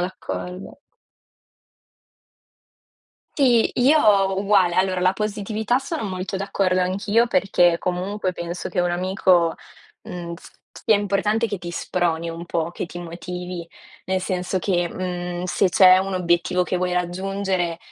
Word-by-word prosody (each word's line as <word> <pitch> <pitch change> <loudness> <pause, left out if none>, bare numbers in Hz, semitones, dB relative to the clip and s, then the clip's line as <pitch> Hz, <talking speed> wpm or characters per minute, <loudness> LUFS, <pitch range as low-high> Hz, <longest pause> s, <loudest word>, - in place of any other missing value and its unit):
d'accordo. 180 +2 -6 2.6
Sì, 245 -5 +3
io 280 +5 +5 0.4
uguale. 195 -4 +3
Allora, 185 -1 +1
la 185 +1 +3
positività 215 +3 -1
sono 310 +3 -4
molto 190 -1 -4
d'accordo 190 -1 0
anch'io, 205 +5 +1
perché 180 -9 +3
comunque 185 +2 -2
penso 170 0 -5
che - - -6
un 175 0 +1
amico 180 -2 +2 0.5
mhmm, 170 -1 -6
s 170 - -14 0.3
sia 220 - +5
importante 205 +3 0
che 205 -2 -3
ti 175 -1 -7
sproni 170 -1 -1
un 165 +1 -6
po', 170 -1 -2
che - - -4
ti 175 0 -9
motivi. 175 0 -6 0.4
Nel 190 +1 -1
senso 185 0 -2
che, 175 -2 0
mhmm, 180 0 -4
se 185 +1 +1
c'è 185 0 +7
un 190 +1 -1
obiettivo 180 0 +1
che 180 - -2
vuoi 180 0 -1
raggiungere, 180 -1 -2
185 Hz, 135 wpm, -22 LUFS, 175-195 Hz, 2.6 s, c'è